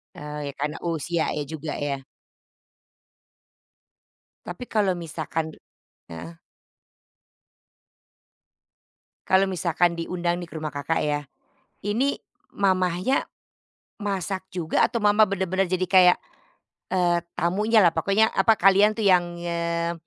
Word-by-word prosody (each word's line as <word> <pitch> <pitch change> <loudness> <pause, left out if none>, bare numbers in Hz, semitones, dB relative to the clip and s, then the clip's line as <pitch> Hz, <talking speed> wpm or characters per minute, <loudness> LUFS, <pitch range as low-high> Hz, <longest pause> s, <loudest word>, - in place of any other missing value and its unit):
Eee, 150 0 -6
ya 140 - -6
karena 150 +2 -2
usia 165 0 -1
ya 150 - -2
juga 155 +1 -6
ya. 140 -2 -3 2.4
Tapi - - -7
kalau 205 -4 +2
misalkan 160 -1 -4
de - - -16 0.6
heeh. 80 0 -9 2.9
Kalau 190 +1 +3
misalkan 175 -1 +1
diundang 175 0 -2
nih 175 - -6
ke - - -15
rumah 155 -1 -3
Kakak 145 +3 -1
ya, 145 -1 -1 0.6
ini 235 +7 0 0.3
mamanya 185 +4 +1 0.8
masak 195 -2 -3
juga 170 -3 -1
atau 235 - -2
mama 210 0 +5
bener-bener 190 -1 0
jadi 185 0 0
kayak, 180 -1 +6 0.7
eee, 175 -2 +2 0.2
tamunyalah 205 +2 +3
pokoknya, 200 +7 +2
apa, 225 - +4
kalian 200 +2 +5
tuh 220 - -3
yang, 175 -2 +3
eee, 170 0 -2
175 Hz, 110 wpm, -24 LUFS, 160-195 Hz, 2.9 s, kayak